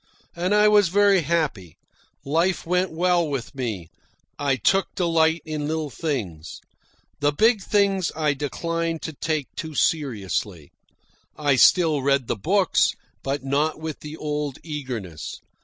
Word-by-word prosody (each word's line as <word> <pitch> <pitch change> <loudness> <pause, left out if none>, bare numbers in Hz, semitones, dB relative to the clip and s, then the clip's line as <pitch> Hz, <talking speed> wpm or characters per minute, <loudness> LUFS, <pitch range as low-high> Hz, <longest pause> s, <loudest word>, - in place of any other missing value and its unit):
And 180 +4 +1
I 210 0 +5
was 210 -2 +5
very 200 +1 +4
happy. 145 - -2 0.5
Life 165 +6 +1
went 180 +2 +1
well 175 0 +1
with 135 -3 -4
me, 110 - -4 0.5
I 140 -2 +1
took 190 - +2
delight 165 -2 +2
in 155 -2 -3
little 155 -2 -2
things. 100 - -4 0.6
The 145 0 +2
big 220 +7 +3
things 195 -3 +1
I 155 -2 +1
declined 165 +3 -3
to 160 - -4
take 155 -1 -2
too 155 -1 -6
seriously. 105 - -1 0.7
I 145 -3 +2
still 155 +1 +5
read 140 -1 +2
the - - -1
books, 185 - +2 0.3
but 140 0 -3
not 145 +3 0
with 160 -1 -5
the 150 +1 -8
old 150 -3 -3
eagerness. 125 - -6
155 Hz, 140 wpm, -24 LUFS, 135-170 Hz, 0.7 s, I